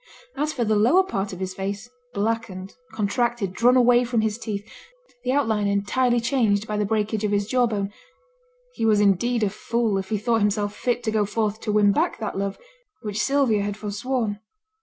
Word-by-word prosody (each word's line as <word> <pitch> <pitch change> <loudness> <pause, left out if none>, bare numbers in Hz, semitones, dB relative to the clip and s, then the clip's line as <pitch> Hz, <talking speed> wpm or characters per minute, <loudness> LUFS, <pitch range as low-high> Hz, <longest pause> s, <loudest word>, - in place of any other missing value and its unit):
As 300 +2 -1
for 245 -6 -1
the 215 0 +2
lower 245 - +5
part 200 - -3
of 180 - -8
his 185 0 -3
face, 200 +4 -4 0.2
blackened, 205 -3 -3 0.2
contracted, 220 -1 -1
drawn 245 +5 +4
away 245 0 +5
from 235 -2 0
his 220 +1 -1
teeth, 210 -2 -5 0.6
the 250 - 0
outline 225 -7 +1
entirely 240 +5 +1
changed 225 -4 +1
by 210 - -2
the 210 -1 0
breakage 215 0 -1
of 210 - 0
his 205 0 +1
jaw 250 +2 +2
bone, 205 -2 -3 0.8
he - - -4
was 215 -2 +4
indeed 210 +4 +2
a 205 - +2
fool 220 -1 -1
if 190 0 -6
he 215 - 0
thought 225 +2 +1
himself 205 0 0
fit 245 -1 -1
to 220 - -1
go 215 -1 +2
forth 215 +1 -1
to 215 - -3
win 205 -1 +4
back 320 - 0
that 215 - -4
love 195 0 -2 0.5
which 210 -1 -3
Sylvia 270 -6 +2
had 205 0 -3
forsworn. 210 +1 -2
215 Hz, 195 wpm, -24 LUFS, 205-240 Hz, 0.8 s, lower